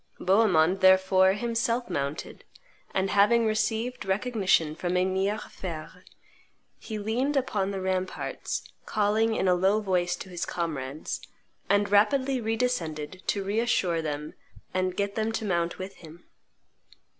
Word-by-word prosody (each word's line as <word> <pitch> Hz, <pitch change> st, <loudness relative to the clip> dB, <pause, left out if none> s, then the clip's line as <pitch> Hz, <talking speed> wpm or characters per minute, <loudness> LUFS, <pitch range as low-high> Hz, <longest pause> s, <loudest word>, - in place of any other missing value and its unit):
Bohemond, 190 Hz, -3 st, +3 dB
therefore, 190 Hz, 0 st, +5 dB
himself 235 Hz, +2 st, -1 dB
mounted; 140 Hz, -4 st, -4 dB, 0.5 s
and, 190 Hz, 0 st, 0 dB
having 225 Hz, +3 st, +4 dB
received 220 Hz, +3 st, -1 dB
recognition 190 Hz, -6 st, +1 dB
from 175 Hz, +3 st, -2 dB
Emir 190 Hz, +3 st, +1 dB
Fein, 170 Hz, -6 st, -7 dB, 0.9 s
he 220 Hz, -, -6 dB
leaned 245 Hz, +7 st, 0 dB
upon 210 Hz, -7 st, 0 dB
the 195 Hz, -1 st, -3 dB
ramparts, 185 Hz, 0 st, -3 dB, 0.2 s
called 210 Hz, 0 st, +1 dB
in 225 Hz, -3 st, +2 dB
a 180 Hz, -, +5 dB
low 190 Hz, +4 st, +3 dB
voice 180 Hz, -3 st, 0 dB
to 190 Hz, -, -9 dB
his 175 Hz, -1 st, -4 dB
comrades, 150 Hz, -4 st, -4 dB, 0.5 s
and 200 Hz, 0 st, +2 dB
rapidly 260 Hz, +5 st, +3 dB
re 225 Hz, 0 st, 0 dB
descended 175 Hz, -9 st, -2 dB
to 200 Hz, -, 0 dB
reassure 200 Hz, -5 st, +1 dB
them 150 Hz, -1 st, -4 dB, 0.4 s
and 185 Hz, 0 st, -1 dB
get 200 Hz, 0 st, -1 dB
them 220 Hz, +1 st, -1 dB
to 220 Hz, -, -2 dB
mount 170 Hz, -3 st, 0 dB
with 190 Hz, +1 st, -7 dB
him. 165 Hz, +1 st, -13 dB
195 Hz, 135 wpm, -27 LUFS, 180-220 Hz, 0.9 s, therefore